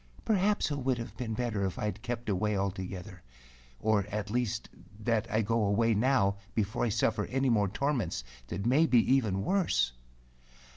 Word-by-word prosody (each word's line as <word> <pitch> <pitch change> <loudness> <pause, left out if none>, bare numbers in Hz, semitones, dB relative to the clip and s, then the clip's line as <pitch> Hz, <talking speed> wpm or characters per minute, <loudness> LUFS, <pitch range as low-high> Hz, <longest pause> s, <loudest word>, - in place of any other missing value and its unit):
Perhaps 205 -4 +2
it 145 - -1
would 130 -1 0
have 115 0 -6
been 115 -3 -3
better 115 -4 -1
if 95 -2 -2
I - - -2
had 105 +1 -3
kept 120 -1 -4
away 105 +1 0
altogether; 95 -1 -4 0.6
or 105 -2 +2
at 105 0 -3
least 120 -2 -1 0.3
that 110 0 0
I 110 +1 +1
go 115 +1 +1
away 115 +3 +3
now 105 -3 +2 0.2
before 105 -1 0
I - - +1
suffer 105 0 +1
any 135 0 +1
more 105 -3 +3
torments 110 - -1 0.2
that 90 - -4
may 145 +7 +4
be 125 - +4 0.2
even 105 -8 +1
worse." 175 - +1
110 Hz, 175 wpm, -30 LUFS, 100-125 Hz, 0.6 s, may